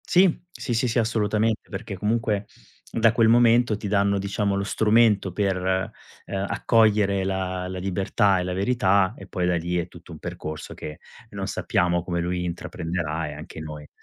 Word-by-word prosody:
Sì, 180 Hz, -2 st, +4 dB
sì, 125 Hz, -, -4 dB
sì, 120 Hz, +2 st, +1 dB
sì, 120 Hz, +1 st, +1 dB
assolutamente, 110 Hz, -1 st, 0 dB
perché 100 Hz, 0 st, -5 dB
comunque, 105 Hz, 0 st, 0 dB, 0.5 s
da 115 Hz, -1 st, +3 dB
quel 115 Hz, -1 st, +4 dB
momento 120 Hz, -1 st, +4 dB
ti 105 Hz, -, -5 dB
danno, 100 Hz, 0 st, +2 dB
diciamo, 100 Hz, 0 st, -1 dB
lo 100 Hz, -, -1 dB
strumento 110 Hz, -2 st, +3 dB
per, 95 Hz, +1 st, 0 dB, 0.7 s
uhm, 95 Hz, 0 st, -3 dB
accogliere 105 Hz, -2 st, +3 dB
la 95 Hz, -1 st, -2 dB
la 95 Hz, -, -5 dB
libertà 95 Hz, +1 st, +1 dB
e -, -, -1 dB
la 90 Hz, 0 st, -3 dB
verità, 100 Hz, -1 st, +2 dB
e -, -, -11 dB
poi 90 Hz, -, -2 dB
da 90 Hz, -, +2 dB
lì 85 Hz, +1 st, -1 dB
è 85 Hz, 0 st, -1 dB
tutto 85 Hz, -1 st, -14 dB
un 80 Hz, -, -9 dB
percorso 75 Hz, 0 st, -6 dB
che 75 Hz, 0 st, -8 dB, 0.3 s
non -, -, -5 dB
sappiamo 85 Hz, 0 st, 0 dB
come 85 Hz, -1 st, -2 dB
lui 90 Hz, +1 st, -1 dB
intraprenderà, 80 Hz, -2 st, -3 dB
e -, -, -6 dB
anche 75 Hz, +2 st, -9 dB
noi. 75 Hz, -1 st, -8 dB
100 Hz, 175 wpm, -24 LUFS, 90-110 Hz, 0.7 s, Sì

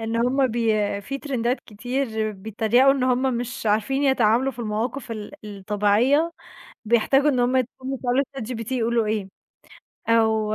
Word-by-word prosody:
إن 225 Hz, +1 st, -2 dB
هم 255 Hz, +3 st, +2 dB
بي 220 Hz, -4 st, 0 dB
في 275 Hz, +7 st, -5 dB
ترندات 255 Hz, -3 st, -1 dB
كتير 220 Hz, -1 st, -3 dB
بيتّريقوا 220 Hz, +6 st, +2 dB
إن 275 Hz, -2 st, -2 dB
هم 255 Hz, 0 st, +1 dB
مش 240 Hz, -1 st, -4 dB
عارفين 220 Hz, +6 st, +1 dB
يتعاملوا 260 Hz, 0 st, +3 dB
في 240 Hz, -, -20 dB
المواقف 230 Hz, +3 st, -3 dB
ال 215 Hz, +1 st, -6 dB
الطبيعية 210 Hz, -, +1 dB, 0.5 s
بيحتاجوا 240 Hz, +6 st, +3 dB
إن 255 Hz, -, 0 dB
هم 245 Hz, +2 st, +2 dB
يقوموا 260 Hz, +1 st, -3 dB
يسألوا 255 Hz, +2 st, +1 dB
ChatGPT 230 Hz, 0 st, -5 dB
يقولوا 235 Hz, -2 st, +1 dB
إيه، 210 Hz, -2 st, -2 dB, 0.8 s
أو 220 Hz, -2 st, +2 dB
235 Hz, 140 wpm, -23 LUFS, 215-260 Hz, 0.8 s, يتعاملوا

